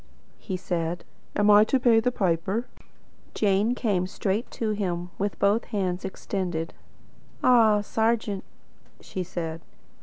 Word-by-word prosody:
he 190 -3 -4
said. 175 -1 -2 0.3
"Am 205 0 +4
I 205 +1 +8
to 265 - +2
pay 235 -3 +5
the 250 +2 +1
piper?" 190 +2 0 0.7
Jane 210 +3 +2
came 195 -7 0
straight 200 +3 -2
to 220 -2 -2
him, 180 -4 -2
with 200 0 -1
both 205 +4 +2
hands 185 -3 -2
extended. 180 -4 -3 0.7
"Ah, 225 -4 +5
serjeant!" 220 -2 0 0.6
she 185 - -5
said. 165 -2 -4
200 Hz, 125 wpm, -26 LUFS, 180-220 Hz, 0.7 s, I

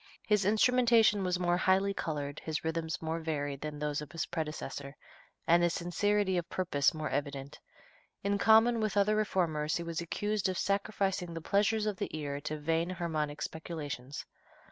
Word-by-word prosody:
His 210 -3 +2
instrumentation 225 -1 +4
was 180 -1 +1
more 175 -1 +2
highly 190 +2 +3
colored, 145 -5 -4
his 160 -1 -3
rhythms 160 0 -2
more 160 +1 -1
varied 145 -4 -3
than 150 -1 -5
those 150 0 -2
of 150 -1 -9
his 165 - -2
predecessor, 150 -3 -5 0.5
and 170 +1 +5
his 175 0 +2
sincerity 190 +2 +1
of 170 - -7
purpose 160 -7 +2
more 155 -2 -4
evident. 140 -1 -3 0.6
In 200 0 +1
common 225 +2 +5
with 215 -2 -1
other 205 +1 +4
reformers 170 -7 0
he 170 - -4
was 170 0 -3
accused 205 +3 -1
of 185 - -2
"sacrificing 195 -3 -1
the - - -3
pleasures 210 +5 +1
of 210 -3 -1
the - - -3
ear 145 -1 -4
to 155 +1 -3
vain 165 +3 0
harmonic 155 -5 -2
speculations." 145 -5 -6
170 Hz, 165 wpm, -31 LUFS, 150-200 Hz, 0.6 s, and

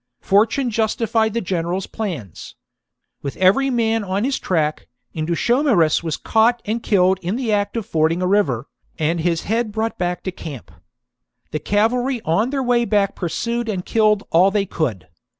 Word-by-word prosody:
Fortune 225 +6 +2
justified 220 0 0
the 235 - 0
general's 180 0 -2
plans. 170 - -6 0.7
With 140 - -5
every 200 +9 +4
man 225 -3 +1
on 195 +1 -1
his 270 +2 0
track, 155 -4 -1 0.3
Indutiomarus 170 - +2
was 160 -3 -3
caught 230 +2 +2
and 225 +3 -2
killed 190 -3 +2
in 180 +5 -2
the 245 -3 -2
act 205 +2 0
of 225 - -3
fording 160 +1 +1
a 185 - 0
river, 180 - +1 0.3
and 160 +2 0
his 165 0 0
head 225 +1 -1
brought 220 +1 -3
back 180 0 -2
to 185 - -3
camp. 150 -8 -9 0.8
The 155 - -2
cavalry 235 - +1
on 210 +9 +1
their 270 -1 -1
way 245 -1 +2
back 205 -4 +1
pursued 235 +6 -3
and 185 -4 -3
killed 215 -2 +2
all 180 +4 +5
they 200 0 0
could. 130 - -3
205 Hz, 165 wpm, -20 LUFS, 170-230 Hz, 0.8 s, all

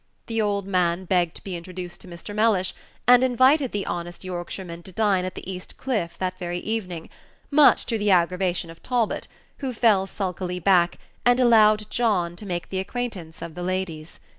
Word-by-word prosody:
The 225 -1 -1
old 200 -2 0
man 180 -1 +1
begged 175 -2 +1
to - - -11
be 190 -2 -5
introduced 175 0 -7
to - - -11
Mr. 175 +4 -9
Mellish, 210 -3 +2 0.3
and 250 0 +7
invited 260 +2 +4
the 205 -1 -2
honest 175 +1 -5
Yorkshireman 175 -1 -6
to 190 - -12
dine 195 -2 +2
at 185 - -5
the - - -8
East 185 -1 -7
Cliff 215 -11 -2
that 185 0 -3
very 175 -1 -3
evening, 180 -5 -4 0.4
much 290 0 +6
to 225 -2 -1
the 205 0 +1
aggravation 180 -1 +2
of 165 - -15
Talbot, 245 -4 -1 0.3
who 270 -2 -2
fell 210 -4 +3
sulkily 185 -2 -3
back, 175 -1 +3 0.3
and 245 +1 +4
allowed 215 -3 +5
John 195 -8 +1
to 210 - -9
make 175 -3 -3
the 190 - -2
acquaintance 190 -7 -5
of 170 -1 -7
the 180 - -7
ladies. 175 -3 -4
190 Hz, 185 wpm, -24 LUFS, 175-220 Hz, 0.4 s, and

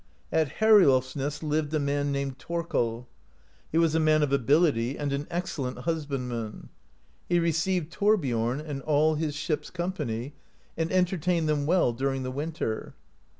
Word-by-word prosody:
At 160 -4 +1
Heriolfsness 145 -8 +4
lived 150 -1 0
a - - +2
man 145 0 0
named 140 -1 -3
Thorkel. 125 -9 -2 0.6
He 160 - 0
was 165 -2 +3
a 160 - +3
man 155 -1 +4
of 140 -2 0
ability 140 -2 +2
and 145 -1 -2
an 140 +1 -3
excellent 160 -7 -3
husbandman. 125 -8 -3 0.6
He 175 - +3
received 170 0 0
Thorbiom 135 - +1
and 145 -3 -5
all 155 +2 +3
of 150 - -3
his 155 -2 -2
ship's 150 +1 -2
company, 150 -9 -3 0.4
and 165 0 -1
entertained 180 -2 +1
them 150 -1 0
well 170 -8 +3
during 135 +2 -1
the 130 - -3
winter. 145 -5 -4
150 Hz, 150 wpm, -27 LUFS, 135-165 Hz, 0.6 s, Heriolfsness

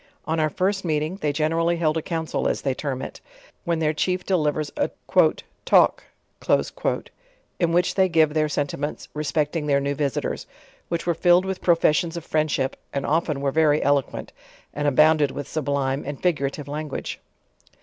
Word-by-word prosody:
On 160 +1 -1
our 155 -1 +2
first 195 +5 0
meeting, 155 +2 -1
they 150 -7 0
generally 165 +3 +1
held 155 -2 +1
a 160 - 0
council 160 0 -2
as - - -1
they 135 - +1
term 130 -1 -4
it, - - -8 0.4
when 170 -1 +1
their 155 -1 +1
chief 180 +3 -1
de 190 - +2
livers 150 -2 0
a 290 - 0 0.7
"talk," - - +4 1.6
in 170 -2 +2
which 175 +1 +2
they 190 -1 +3
give 160 -3 +3
their 155 -1 +1
sentiments 145 0 -3
respect 150 +1 -1
ing 150 -2 -2
their 140 -1 +3
new 140 0 -1
visitors; 140 -2 -2 0.4
which 170 -1 -2
were 170 - +2
filled 175 +2 +4
with 190 -1 -3
professions 170 -1 +2
of 170 - -8
frsindship, 150 -4 0 0.2
and 140 - -2
often 155 -2 0
were 140 -1 0
very 155 0 +3
eloquent, 140 -1 0 0.4
and 145 0 -1
abounded 150 +1 +4
with 145 +1 -6
sublime 140 -2 -1
and 145 -1 -6
figurative 145 -4 -1
language. 150 0 -5
155 Hz, 170 wpm, -24 LUFS, 145-165 Hz, 1.6 s, talk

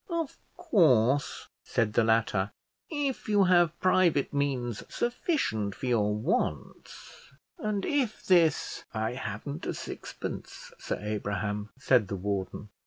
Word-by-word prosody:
"Of 335 -4 -3 0.2
course," 145 - +3 0.2
said 105 -2 0
the 120 - +4
latter, 110 -3 +1 0.4
"if 285 -7 -2
you 205 -1 +5
have 175 -3 +4
private 180 -7 +3
means 130 -5 -1
sufficient 240 - -1
for - - -6
your 105 -4 +2
wants, 105 +4 -3 0.3
and 210 -2 -1
if 265 -7 -1
this 170 -5 +3
" - - -34
"I 110 +1 0
haven't 125 - -5
a - - -2
sixpence, - - -7
Sir - - -3
Abraham," 105 0 -3
said 125 -5 +3
the 100 - -3
warden. 100 +1 -3
130 Hz, 125 wpm, -29 LUFS, -, 0.4 s, you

